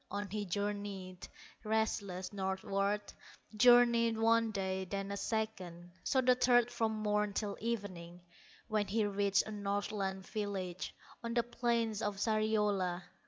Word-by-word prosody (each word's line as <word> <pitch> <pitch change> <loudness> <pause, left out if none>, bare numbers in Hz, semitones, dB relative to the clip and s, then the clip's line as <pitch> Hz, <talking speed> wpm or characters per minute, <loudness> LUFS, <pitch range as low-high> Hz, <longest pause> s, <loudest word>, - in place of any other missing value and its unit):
On 205 +1 -3
he 210 0 -2
journeyed, 200 -1 -4 0.4
restless, 210 -4 -1
northward, 195 +1 -1 0.4
Journeyed 235 -1 +6
one 225 0 +3
day, 190 -2 -2
then 195 +1 -4
a - - -2
second, 185 -6 -3
So 260 - +2
the 255 0 +5
third 245 -1 +4
from 225 -1 0
morn 210 -1 0
till 205 0 -2
evening, 185 -6 -4 0.5
When 215 -2 0
he 215 +2 +1
reached 200 -1 +2
a 215 - -6
Northland 200 -2 -2
village 190 -4 -4 0.3
On 235 0 -3
the 235 - +3
plains 235 -2 0
of 205 -1 -1
Sariola. 210 -4 +1
205 Hz, 130 wpm, -34 LUFS, 195-220 Hz, 0.5 s, Journeyed